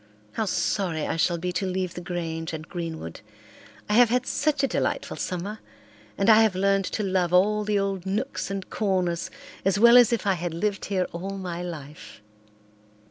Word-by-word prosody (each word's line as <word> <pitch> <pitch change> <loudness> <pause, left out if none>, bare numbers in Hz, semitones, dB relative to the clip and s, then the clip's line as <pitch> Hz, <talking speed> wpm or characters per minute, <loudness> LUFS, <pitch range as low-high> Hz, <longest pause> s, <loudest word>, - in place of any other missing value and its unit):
How 220 - -2
sorry 180 -5 -1
I - - -2
shall 170 +1 +1
be 180 +2 -3
to 185 +2 -2
leave 185 -1 -2
the 175 - -7
Grange 165 -2 -4
and 160 0 -6
Greenwood. 165 - -6 0.7
I 210 - -1
have 240 +1 +6
had 250 +1 +1
such 285 0 0
a - - +4
delightful - - -2
summer, 195 +4 -4 0.6
and 195 - +1
I 220 0 +8
have 220 -4 +3
learned 195 +1 +2
to 215 - -2
love 185 -3 0
all 210 +4 +4
the 210 0 0
old 195 -2 -2
nooks 215 +7 -2
and 195 -1 -4
corners 185 -5 0 0.3
as 195 +1 +2
well 235 +3 +8
as 245 -2 +6
if 230 -4 -1
I 195 - +3
had 175 -2 -4
lived 200 +3 -1
here 190 -2 0
all 195 +3 -5
my 175 -2 -5
life." 155 -4 -8
190 Hz, 190 wpm, -25 LUFS, 175-210 Hz, 0.7 s, I